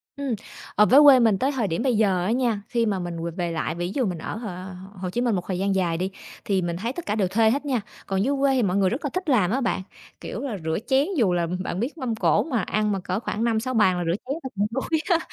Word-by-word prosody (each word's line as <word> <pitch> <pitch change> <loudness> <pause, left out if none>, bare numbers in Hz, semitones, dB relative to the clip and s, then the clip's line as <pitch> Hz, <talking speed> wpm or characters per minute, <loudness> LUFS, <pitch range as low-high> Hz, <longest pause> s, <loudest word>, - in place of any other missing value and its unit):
Ừm, 280 -4 -2 0.4
ờ, 210 - +6
với 260 +6 +7
quê 280 -3 +9
mình 225 -5 +4
tới 265 +7 +1
thời 250 -7 -1
điểm 165 -2 -2
bây 255 -5 +2
giờ 195 -5 +2
á 205 - +1
nha, 235 -4 +1
thi 235 -2 +1
mà 200 -3 0
mình 170 -2 -5
về 170 - -3
về 175 0 -3
lại, 160 -1 -2
ví 175 +1 -3
dụ 260 - +1
mình 180 -4 -2
ở 160 - -5
H 230 - -7 0.5
Hồ 185 0 -3
Chí 240 +7 -2
Minh 240 -4 +1
một 180 - -1
thời 185 -2 -2
gian 195 0 +1
dài 175 -3 +1
đi, 185 +3 -2 0.3
thì 195 -2 +1
mình 170 -1 -2
thấy 230 +7 -3
tất 345 - -7
cả 210 - -1
đều 200 -4 +1
thuê 220 +4 +3
hết 280 +4 -1
nha. 260 -5 0 0.3
Còn 195 0 0
dưới 280 +5 +1
quê 275 0 +3
thì 250 - +2
mọi 190 -1 +1
người 195 -2 +3
rất 250 - -3
là - - 0
thích 370 -3 -2
làm 210 -9 +3
á 260 +4 0
bạn, 230 -5 0 0.4
kiểu - - -5
là, 255 -7 -3
rửa 160 0 -1
chén 270 +2 +3
dù 210 -9 +3
là 170 -1 0 0.2
bạn 185 - -3
biết 255 +9 -3
mâm 255 -6 -2
cổ - - +2
mà 250 -8 -1
ăn 210 +3 0
mà 195 - -1
cỡ 185 +1 -2
khoảng 220 -1 -3
5,6 235 +2 0
bàn 190 -6 +3
là 175 - -1
rửa 165 +1 +1
chén 265 - -2
là 265 - -4
cũng 205 +1 +1
đuối 270 +6 -1
á. 345 -3 +4
215 Hz, 300 wpm, -24 LUFS, 185-255 Hz, 0.5 s, quê